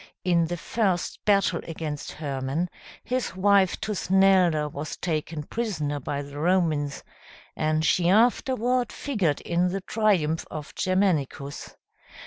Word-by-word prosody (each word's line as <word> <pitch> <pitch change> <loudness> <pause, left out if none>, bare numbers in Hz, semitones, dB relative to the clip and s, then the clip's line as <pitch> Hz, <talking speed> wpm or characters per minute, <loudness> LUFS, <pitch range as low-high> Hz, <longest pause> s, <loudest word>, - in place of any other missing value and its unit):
In 170 -2 +2
the 175 +1 -3
first 190 -1 -1
battle 200 -4 +3
against 155 -3 -5
Hermann, 145 +3 -3 0.3
his 250 -3 -2
wife 195 -1 +3
Tusnelda, 190 -6 +3
was 150 +1 -6
taken 155 -2 -3
prisoner 155 -8 -2
by 140 +1 -3
the 140 +1 -9
Romans, 160 -4 +1 0.5
and 155 0 0
she 175 +1 +3
afterward 245 +3 +2
figured 195 - -1
in 175 +1 +1
the 195 +2 -2
triumph 185 -7 +1
of 150 -1 -7
Germanicus. 160 -7 -1
175 Hz, 115 wpm, -26 LUFS, 150-195 Hz, 0.5 s, battle